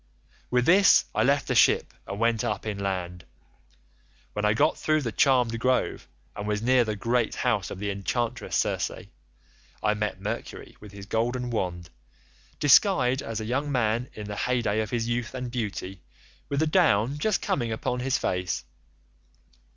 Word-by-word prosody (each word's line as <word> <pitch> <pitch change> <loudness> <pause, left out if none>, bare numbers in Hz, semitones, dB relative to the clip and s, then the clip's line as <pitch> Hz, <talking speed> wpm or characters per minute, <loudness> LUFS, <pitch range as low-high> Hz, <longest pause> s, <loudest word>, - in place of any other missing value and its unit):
"With 125 0 +2
this 190 +3 +6
I - - +1
left - - +2
the - - 0
ship - - +3
and 100 - -5
went 115 -1 +1
up 105 -1 -2
inland. 95 -4 -3 1.1
When 105 - -2
I 105 +1 +3
got 150 +6 +3
through 155 -1 0
the 115 - -2
charmed 125 -1 +2
grove, 130 +1 0 0.3
and 105 - -5
was 105 0 -1
near 125 0 +4
the 110 -2 -3
great 115 +3 0
house 110 -9 0
of - - -7
the 100 +1 -3
enchantress 110 +4 -2
Circe, - - 0 0.9
I 105 - +3
met 105 -2 -3
Mercury 100 +2 -6
with 105 -1 -12
his 100 -1 -10
golden 120 +3 -1
wand, 90 -6 -3 0.7
disguised 140 - +4
as 115 -1 -4
a 110 - -4
young 140 +5 -1
man 120 -1 0
in 105 - -7
the 105 0 -5
hey 125 -1 0
day 110 0 +1
of 110 - -4
his 115 -1 -1
youth 120 +1 -2
and 125 -1 -5
beauty 100 -6 -4 0.5
with 140 +1 0
the - - +3
down 145 - +2
just 210 +4 +1
coming 120 -3 -1
upon 120 +3 -2
his 130 +1 0
face. 90 0 -2
115 Hz, 170 wpm, -26 LUFS, 105-125 Hz, 1.1 s, this